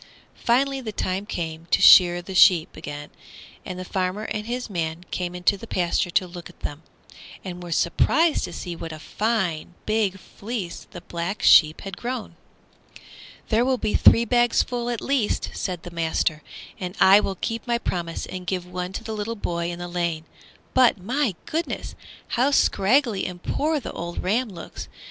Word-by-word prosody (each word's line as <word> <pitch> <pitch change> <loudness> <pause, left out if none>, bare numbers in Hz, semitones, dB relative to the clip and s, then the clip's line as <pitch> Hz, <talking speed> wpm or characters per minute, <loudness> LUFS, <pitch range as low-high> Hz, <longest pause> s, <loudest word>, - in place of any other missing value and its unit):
Finally 270 +3 +1
the 225 -4 -5
time 195 0 -2
came 165 -3 -5
to - - +3
shear 175 -1 +7
the 190 - -7
sheep 180 -3 +5
again, 145 -1 -7 0.5
and 185 - -6
the 185 - -6
farmer 185 +3 -2
and 210 0 -4
his 245 +1 -3
man 170 -4 -3
came 180 -1 -3
into 180 +3 +2
the - - -10
pasture 175 0 0
to 185 - +2
look 175 -1 -9
at - - -19
them, 145 +2 -5 0.6
and 180 -1 -6
were 175 -1 -8
surprised 300 - +2
to - - -8
see 175 -2 -6
what 165 0 -7
a 155 - -7
fine, 185 -3 -2
big 215 -3 +1
fleece 200 -1 -6
the 175 - -9
Black 175 +3 -4
Sheep 155 -1 +6
had 195 -2 -7
grown. 245 -1 -5 1.1
"There 225 +1 +3
will 260 0 +1
be 215 -3 -2
three 235 - +6
bagsful 240 +1 +1
at 240 -2 -3
the - - -7
least," 270 -6 0
said 180 -3 -4
the 175 - -8
master, 160 -2 0 0.4
"and 180 0 -5
I 195 +2 +8
will 195 -2 -2
keep 230 +5 -4
my 235 0 +2
promise 170 -7 -3
and 185 -1 -7
give 180 -1 -2
one 180 +1 -5
to - - -5
the 220 - -5
little 215 +2 -3
boy 170 -5 -2
in 175 - -5
the 175 0 -6
lane. 170 -2 -2 0.5
But, 255 -4 +5
my 235 +2 -1
goodness! 330 +2 -3 0.4
how 255 +4 +2
scraggly 235 -3 +2
and 180 -1 -8
poor 310 +1 0
the 255 - -7
old 170 +1 -5
ram 225 +6 +1
looks. 175 -4 -9
190 Hz, 180 wpm, -24 LUFS, 175-230 Hz, 1.1 s, I